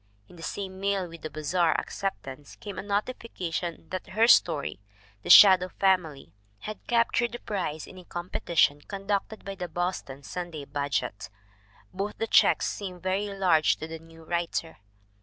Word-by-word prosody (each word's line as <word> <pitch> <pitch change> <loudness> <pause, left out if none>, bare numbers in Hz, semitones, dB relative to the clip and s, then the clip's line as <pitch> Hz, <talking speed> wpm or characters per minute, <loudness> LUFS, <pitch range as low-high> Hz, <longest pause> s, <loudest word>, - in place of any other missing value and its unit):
In - - -16
the 165 - -12
same 190 +2 -5
mail 195 -2 0
with 165 -1 -12
the 155 - -5
Bazar 155 +3 +1
acceptance 145 -8 -6
came 205 -2 -7
a - - -2
notification 200 -5 -3
that 185 -1 -5
her 220 +4 +3
story, 150 - +4 0.4
The - - -8
Shadow 185 -2 +9
Family, 165 - 0 0.3
had 215 0 -6
captured 235 0 +2
the 240 - -5
prize 170 -7 -3
in 185 - -12
a - - -12
competi 175 -1 -6
tion 145 -1 +5
conducted 200 +4 -3
by 195 - -4
the 180 -2 -5
Boston 170 -5 -4
Sunday 170 -4 -6
Budget. 135 -8 -3 0.6
Both 200 +3 -4
the 225 - -1
checks - - +4
seemed 185 -3 -5
very 190 +2 0
large 180 -6 +3
to 160 - -6
the 160 0 -7
new 165 0 -16
writer. 170 -1 -2
180 Hz, 160 wpm, -27 LUFS, 160-195 Hz, 0.6 s, Shadow